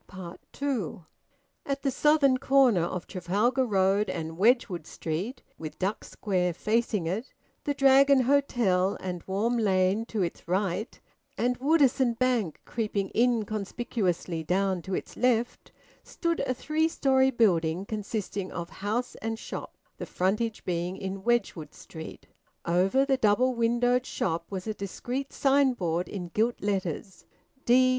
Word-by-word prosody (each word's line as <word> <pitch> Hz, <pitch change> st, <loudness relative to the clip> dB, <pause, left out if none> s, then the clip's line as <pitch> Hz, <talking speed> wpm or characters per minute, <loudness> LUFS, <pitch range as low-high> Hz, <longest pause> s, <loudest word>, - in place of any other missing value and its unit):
TWO. 235 Hz, -, -3 dB, 0.6 s
At 275 Hz, 0 st, -3 dB
the 275 Hz, -, +1 dB
southern 280 Hz, -1 st, +3 dB
corner 265 Hz, -8 st, +4 dB
of 175 Hz, +1 st, -3 dB
Trafalgar 210 Hz, +8 st, 0 dB
Road 195 Hz, 0 st, +2 dB
and 160 Hz, -1 st, -4 dB
Wedgwood 195 Hz, -, +2 dB
Street, 190 Hz, -, -4 dB, 0.2 s
with 155 Hz, -1 st, -7 dB
Duck 195 Hz, +3 st, -2 dB
Square 180 Hz, -4 st, -1 dB
facing 215 Hz, -2 st, 0 dB
it, 200 Hz, +10 st, -3 dB, 0.3 s
the 285 Hz, -, 0 dB
Dragon 275 Hz, 0 st, +6 dB
Hotel 235 Hz, -8 st, +2 dB
and 180 Hz, -2 st, -5 dB
Warm 220 Hz, +5 st, 0 dB
Lane 195 Hz, +1 st, +2 dB
to 215 Hz, -4 st, -1 dB
its 170 Hz, -, -5 dB
right, 190 Hz, +3 st, -1 dB, 0.4 s
and 245 Hz, +1 st, 0 dB
Woodisun 265 Hz, -4 st, +3 dB
Bank 240 Hz, -10 st, 0 dB
creeping 210 Hz, -4 st, -2 dB
inconspicuously 215 Hz, -6 st, -1 dB
down 185 Hz, +2 st, 0 dB
to 190 Hz, +3 st, -3 dB
its -, -, -6 dB
left, 240 Hz, -1 st, 0 dB, 0.3 s
stood 335 Hz, -1 st, -2 dB
a 255 Hz, -, +1 dB
three 310 Hz, +5 st, 0 dB
storey 265 Hz, -4 st, +3 dB
building 185 Hz, -7 st, +2 dB
consisting 205 Hz, -2 st, -4 dB
of 170 Hz, +1 st, -6 dB
house 220 Hz, +5 st, -2 dB
and 225 Hz, 0 st, -2 dB
shop, -, -, -7 dB, 0.2 s
the -, -, -6 dB
frontage 210 Hz, +5 st, -1 dB
being 175 Hz, +1 st, -2 dB
in 195 Hz, 0 st, -5 dB
Wedgwood 220 Hz, -9 st, -1 dB
Street. 160 Hz, -1 st, -10 dB, 0.4 s
Over 190 Hz, +10 st, +3 dB
the 270 Hz, -1 st, +2 dB
double 250 Hz, +3 st, +3 dB
windowed 245 Hz, +2 st, +1 dB
shop 165 Hz, -1 st, -2 dB
was 190 Hz, -2 st, -5 dB
a 215 Hz, -, -2 dB
discreet 245 Hz, +7 st, -5 dB
signboard 250 Hz, -, +1 dB
in 180 Hz, -4 st, -5 dB
gilt 225 Hz, +6 st, 0 dB
letters, 190 Hz, -2 st, -3 dB, 0.4 s
"D. 255 Hz, +2 st, +5 dB
215 Hz, 135 wpm, -28 LUFS, 185-250 Hz, 0.6 s, Dragon